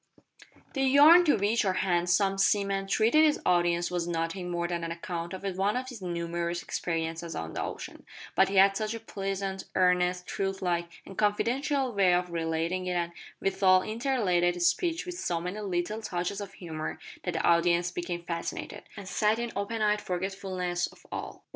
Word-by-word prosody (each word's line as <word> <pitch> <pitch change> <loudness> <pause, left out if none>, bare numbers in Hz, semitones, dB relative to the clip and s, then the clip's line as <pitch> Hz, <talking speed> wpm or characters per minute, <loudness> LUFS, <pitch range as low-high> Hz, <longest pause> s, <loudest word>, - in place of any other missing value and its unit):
The 270 - -1
yarn 290 +6 +7
to 300 - +5
which 210 +3 +2
our 190 -2 +1
handsome 185 +2 +1
seaman 195 -1 +2
treated 225 +10 +4
his 305 -1 +3
audience 175 -1 +2
was 175 -1 -1
nothing 175 +2 -2
more 170 0 -1
than 170 -1 -3
an 165 - -3
account 170 0 -5
of 190 0 -7 0.2
one 205 +5 +2
of 255 0 -4
his 240 -6 -9
numerous 170 0 -3
experiences 165 0 -3
on 80 0 -5
the - - -3
ocean, - - -6 0.3
but - - +4
he 195 - -3
had 195 +1 +6
such 215 +2 -2
a - - -5
pleasant, 195 -3 -4
earnest, 180 0 +2
truth 195 0 -2
like, 170 -1 0 0.2
and 195 - -9
confidential 255 +5 +1
way 190 -3 +4
of 180 0 -1
relating 165 +2 -1
it 180 - 0
and, 170 -1 -1 0.3
withal, 190 -1 +3
interlarded 215 -7 +1
his 175 0 0
speech 335 - 0
with 360 0 -6
so 170 -2 -1
many 180 +5 -4
little 200 +2 -2
touches 195 0 -3
of 195 -1 -7
humour, 160 -5 -5 0.3
that 180 -2 -3
the - - -1
audience 170 +1 +3
became 175 0 -4
fascinated, 170 -1 -5 0.2
and 200 -2 -8
sat 210 +3 +2
in 235 0 -3
open 215 +3 -2
eyed 210 0 +2
forgetfulness 185 -1 -2
of - - -18
all - - -3
else. - - -16
185 Hz, 185 wpm, -29 LUFS, 175-210 Hz, 0.3 s, yarn